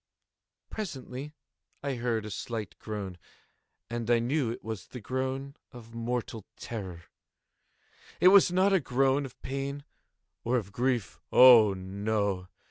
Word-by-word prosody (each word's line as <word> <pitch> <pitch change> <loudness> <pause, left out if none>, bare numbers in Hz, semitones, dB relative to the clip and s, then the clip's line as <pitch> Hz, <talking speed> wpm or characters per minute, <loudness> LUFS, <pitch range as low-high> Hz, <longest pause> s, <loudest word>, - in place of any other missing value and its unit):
Presently 145 - -6 0.5
I 140 -1 -1
heard 120 -3 -1
a 105 - -6
slight 110 0 -5
groan, 100 -4 -6 0.7
and 120 -1 -4
I 120 - +5
knew 125 +2 0
it 115 - -6
was 110 -4 -6
the 125 - -8
groan 130 +4 -3 0.2
of 115 -2 -12
mortal 115 -2 -3
terror. 95 -7 -6 1.2
It 180 - +7
was 195 -2 +7
not 190 +2 +3
a 190 - +5
groan 135 0 +1
of 125 - -19
pain 140 +1 -4 0.6
or 125 +2 +1
of 100 -5 -4
grief—oh, 120 -1 +5
no! 100 0 -2
120 Hz, 130 wpm, -29 LUFS, 110-135 Hz, 1.2 s, It